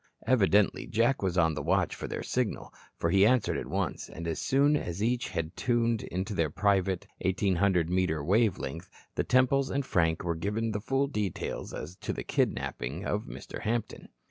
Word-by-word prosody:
Evidently 105 -4 +3
Jack 120 +5 +2
was 95 -2 -1
on 80 -2 +4
the 75 - -3
watch - - +1
for - - -6
their - - -4
signal, - - -2 0.2
for 85 - 0
he 95 +1 +5
answered 120 +1 +3
at - - -3
once, - - -2
and 85 +1 -6
as 80 -2 -2
soon 140 +2 +3
as 95 - -2
each 120 +2 0
had 80 +1 -3
tuned 115 -3 0 0.2
to 105 - -5
their 80 -5 +1
private 95 +1 +1
1,800 95 -2 +2
metre 85 -4 0
wave 105 +5 +3
length, 85 +2 -6 0.2
the - - 0
Temples 130 +2 +3
and 140 0 -1
Frank 80 -6 +1
were 85 -1 0
given 105 +7 -2
the 105 -1 -3
full 135 +5 +1
details 105 - -3
as 85 +5 -7
to - - -4
the - - -5
kidnapping 70 +11 -1
of 105 +1 -1
Mr. - - -8
Hampton. 115 0 -3
100 Hz, 185 wpm, -29 LUFS, 85-115 Hz, 0.2 s, he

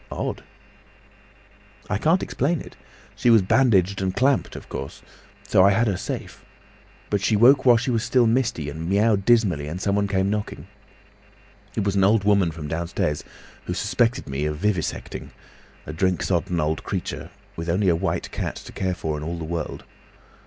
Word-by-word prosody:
"Odd!" - - -3 1.5
"I 105 - -1
can't 165 - +2
explain 150 +5 -1
it. - - -11 0.4
She 120 - +1
was 110 -4 +6
bandaged 100 -4 +3
and 95 -1 -1
clamped, 135 +2 +1
of - - -9
course—so 100 -1 -2
I 100 - +7
had 110 +4 +2
her 100 -4 0
safe; - - -6 0.7
but 100 -2 +1
she 105 +2 +2
woke 130 +5 +5
while 120 -1 +7
she 125 +3 -1
was 115 -1 0
still 120 0 +3
misty, 115 - 0
and 80 +3 -5
miaowed 100 0 +2
dismally, 100 -11 +3
and 85 +4 -5
someone 100 +1 +1
came 95 0 0
knocking. 105 -1 -4 1.1
It 110 - 0
was 100 0 0
an 95 - +3
old 105 +1 +4
woman 100 -4 +3
from 80 -2 -7
downstairs, 80 -2 -2 0.4
who - - -3
suspected 120 +1 0
me 70 +2 -2
of 75 0 -2
vivisecting—a 90 -4 -5
drink 90 +2 0
sodden 90 -1 0
old 75 0 -1
creature, - - -4 0.3
with 85 +1 -5
only 95 +4 +1
a 85 - +3
white 80 - -2
cat - - -3
to - - -10
care 95 -1 -2
for 80 -3 -3
in - - -7
all 85 +2 -4
the 85 - -6
world. 80 0 -4
100 Hz, 175 wpm, -23 LUFS, 85-115 Hz, 1.5 s, I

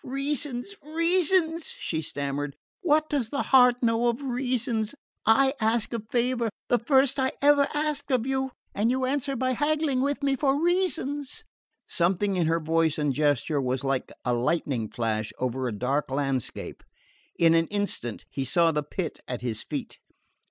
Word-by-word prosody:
"Reasons! 275 +3 -2
reasons!" 335 +1 +2
she 160 -2 -2
stammered. 145 -1 -3 0.3
"What 310 -3 +3
does 275 -7 -1
the 280 - -1
heart 250 -1 +5
know 230 +1 +2
of 240 +4 -1
reasons? 245 -3 -1 0.3
I 265 +4 +5
ask 225 +1 +1
a 230 - -2
favour 240 -1 +1 0.2
the 245 - +3
first 265 +3 +3
I 260 0 +1
ever 285 0 +5
asked 295 -1 -2
of 250 -3 +1
you 265 0 -1 0.2
and 210 +3 +1
you 260 +1 +1
answer 275 +1 -1
it - - -3
by 255 +1 0
haggling 295 0 +1
with 280 +1 -1
me 275 -1 +2
for 275 0 +1
reasons!" 330 -5 -1 0.4
Something 190 +3 +1
in 175 -3 +1
her 165 +1 +2
voice 160 0 +1
and 150 -2 0
gesture 145 0 +1
was 130 0 -1
like 135 -1 -1
a 125 - +1
lightning 120 -2 0
flash 110 -2 -2
over 130 0 -2
a - - -2
dark 130 +8 -1
landscape. 135 -2 -3 0.6
In 165 -1 +5
an 165 0 +3
instant 205 - -3
he 135 - -2
saw 165 +6 +3
the 150 -1 0
pit 160 +4 -5
at 125 -2 -4
his 120 -3 -2
feet. - - -6
235 Hz, 165 wpm, -26 LUFS, -, 0.6 s, heart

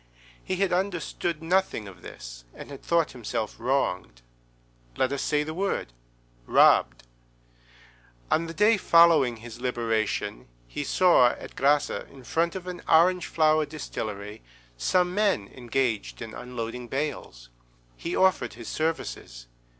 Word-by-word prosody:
He 185 - -2
had 190 0 0
understood 175 -3 -2
nothing 180 - 0
of 90 -3 -13
this, - - -10
and - - -10
had 140 - -9
thought 170 -2 +1
himself 110 -3 -4
wronged. 90 - -1 0.7
Let 130 - +1
us 140 - -2
say 150 -1 +1
the 155 +1 -5
word—robbed. - - +1 1.3
On 165 +1 +2
the 165 - -6
day 210 +2 +4
following 165 -9 +5
his 120 +1 -11
liberation, 115 - -2 0.2
he 145 - -4
saw, 175 -5 +5
at - - -11
Grasse, 145 +2 +2
in 135 -2 -8
front 165 +8 0
of 185 -1 -6
an 180 -1 -6
orange 180 +2 +4
flower 155 -1 +3
distillery, 105 -9 -6 0.3
some 180 - +1
men 195 - +1
engaged 120 -3 -2
in 110 -1 -7
unloading 125 0 -6
bales. 130 - -4 0.5
He 170 - -4
offered 185 -12 +2
his 115 -1 -10
services. 155 - -3
135 Hz, 130 wpm, -26 LUFS, 110-170 Hz, 1.3 s, following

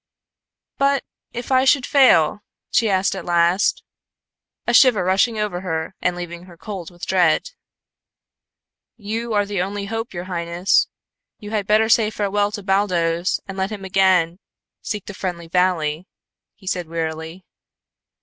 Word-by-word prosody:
"But 275 0 +2 0.3
if 240 +2 -6
I 260 0 +4
should 270 -1 +3
fail?" 210 - +4 0.3
she 225 -2 +3
asked, 190 0 +1
at 190 - -6
last, 175 +3 +2 0.8
a 240 - 0
shiver 240 -5 +6
rushing 195 +5 +2
over 205 -4 -2
her 160 -2 -3
and 180 -1 0
leaving 175 0 -7
her 175 -2 -15
cold 190 -3 -7
with 175 -1 -9
dread. 180 - +2 1.5
"You 225 +2 -4
are 205 0 +2
the 200 -2 -2
only 200 +2 -3
hope, 225 +3 -4
your 175 -1 -5
highness. 175 0 +1 0.5
You 210 -1 -9
had 210 -3 -2
better 215 +1 +4
say 220 -1 +4
farewell 205 -1 0
to 205 - -5
Baldos 180 -3 +1
and 195 0 -6
let 190 +2 -1
him 200 -2 -6
again 185 -2 +2 0.4
seek 210 -3 -4
the 205 - -7
friendly 175 -3 -5
valley," 175 -2 0 0.6
said 180 -2 -2
he - - -20
wearily. 160 +2 -5
190 Hz, 150 wpm, -21 LUFS, 175-210 Hz, 1.5 s, shiver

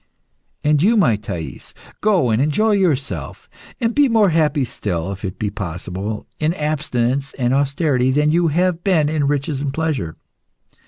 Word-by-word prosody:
"And 150 -1 +3
you, 220 +6 +4
my 125 - +4
Thais, 90 -6 -7 0.3
go 190 - +3
and 110 +3 +2
enjoy 155 +10 +2
yourself, 165 -9 -1 0.3
and 230 -2 0
be 290 0 +4
more 220 -4 +4
happy 150 -4 +2
still, 90 -6 -3
if 95 0 -8
it 95 -1 -4
be 105 0 -2
possible, 95 +4 -5
in 155 +3 0
abstinence 140 -4 -1
and 125 -1 0
austerity 140 -2 +1
than 150 +3 +2
you 170 +1 +3
have 175 +2 +1
been 160 -7 +2
in 150 -2 0
riches 140 0 -1
and 140 -1 -2
pleasure. 145 - -2
145 Hz, 160 wpm, -20 LUFS, 120-165 Hz, 0.3 s, you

